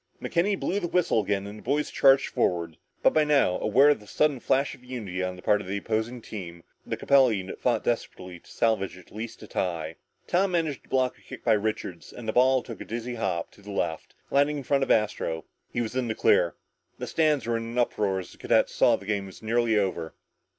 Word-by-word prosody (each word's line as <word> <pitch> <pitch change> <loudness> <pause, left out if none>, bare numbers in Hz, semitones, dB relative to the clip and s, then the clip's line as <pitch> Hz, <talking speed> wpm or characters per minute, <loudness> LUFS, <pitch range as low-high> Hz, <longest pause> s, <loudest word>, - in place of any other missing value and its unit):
McKenny 190 +3 0
blew 200 - 0
the 175 - -2
whistle 170 -10 +2
again 100 -1 -1
and 105 +1 -8
the - - -13
boys 145 +4 -1
charged 135 0 +5
forward, 85 -2 -1 0.3
but - - +5
by 155 - +4
now, 140 -11 +3
aware 130 +7 +5
of 145 - +3
the 105 - -16
sudden 145 +3 +1
flash 135 +3 +1
of 125 - -15
unity 110 -8 -5
on 90 0 -2
the 90 - -13
part 105 0 +3
of - - -10
the 100 +2 -2
opposing 110 +3 -2
team, 85 -5 -8 0.2
the - - -4
Capella 135 -4 +4
unit 95 -2 -5
fought 125 - +1
desperately 90 -6 -3
to - - -21
salvage 105 -5 0
at 95 - -16
least 110 +1 -7
a - - -10
tie. 85 -5 -3 0.3
Tom 185 +1 +1
managed 160 -5 0
to - - -26
block 130 -1 +1
a - - -24
kick - - -11
by 115 - +4
Richards, 105 -5 -3
and 120 -2 -9
the 110 - 0
ball 130 +1 +4
took 115 - -9
a - - -6
dizzy 120 +2 -4
hop 95 -7 -2
to - - -19
the 100 - -12
left, 85 -5 -3 0.2
landing 145 +1 +3
in 140 - -5
front 140 +2 +1
of - - -3
Astro. 105 -7 +1 0.3
He 120 - -1
was 115 +1 -4
in 130 -2 0
the 110 - -2
clear. 85 -2 +3 0.4
The - - -4
stands 155 -5 +1
were 115 0 0
in 115 - -4
an 115 +1 -6
uproar 105 -5 +1
as 95 -2 -6
the - - -17
cadets - - +2
saw - - +4
that - - -10
the - - -11
game 100 -1 -1
was 95 - -13
nearly 115 0 +2
over. 95 -5 -1
110 Hz, 240 wpm, -27 LUFS, 95-130 Hz, 0.4 s, charged